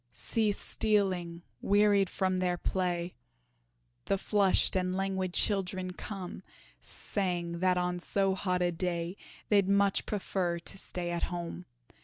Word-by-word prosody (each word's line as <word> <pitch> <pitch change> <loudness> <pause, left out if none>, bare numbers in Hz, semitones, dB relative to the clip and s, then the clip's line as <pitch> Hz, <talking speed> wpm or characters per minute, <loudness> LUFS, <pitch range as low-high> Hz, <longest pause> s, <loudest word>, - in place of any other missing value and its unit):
See 215 - +1
stealing, 185 -5 0 0.2
wearied 205 -2 +4
from 185 -1 0
their 180 -1 +1
play, 175 -1 -1 0.9
The 195 - +1
flushed 200 -1 +3
and 185 0 0
languid 190 -1 -1
children 185 -2 +1
come, 190 -1 -7 0.4
Saying 170 - -2
that 185 0 +3
on 180 0 0
so 195 +2 +1
hot 180 -1 0
a 175 - +2
day 170 0 -2 0.3
They'd 200 -2 +4
much 200 0 +3
prefer 185 -4 -1
to 170 +3 -6
stay 175 -2 -3
at 170 - 0
home. 175 0 -5
185 Hz, 130 wpm, -31 LUFS, 175-195 Hz, 0.9 s, wearied